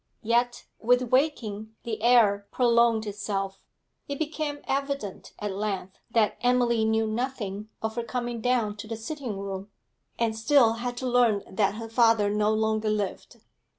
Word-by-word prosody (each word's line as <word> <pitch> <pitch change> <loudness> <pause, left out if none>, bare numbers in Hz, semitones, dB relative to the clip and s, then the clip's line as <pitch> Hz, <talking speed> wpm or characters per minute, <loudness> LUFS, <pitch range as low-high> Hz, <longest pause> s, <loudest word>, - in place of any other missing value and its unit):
Yet 240 +2 +1
with 245 +1 +2
waking 220 -6 0
the 220 -2 -4
error 215 -4 +4
prolonged 235 -2 +3
itself; 200 -2 -3 0.5
it 280 - -4
became 305 -1 -3
evident 275 -7 -3
at 210 -1 -3
length 195 -1 -4
that 225 -2 +1
Emily 245 -2 +3
knew 220 0 +2
nothing 215 -3 -3
of 220 0 -1
her 235 - 0
coming 240 -1 -3
down 230 -4 +1
to 210 - -7
the 225 0 -4
sitting 240 -2 -5
room, 195 0 -5 0.5
and 230 -1 0
still 225 0 +4
had 245 +1 -4
to 255 - -3
learn 240 -5 +3
that 200 +1 0
her 225 +1 -6
father 225 -3 +3
no 210 0 +2
longer 220 0 +1
lived. 210 -2 -3
225 Hz, 150 wpm, -27 LUFS, 210-245 Hz, 0.5 s, error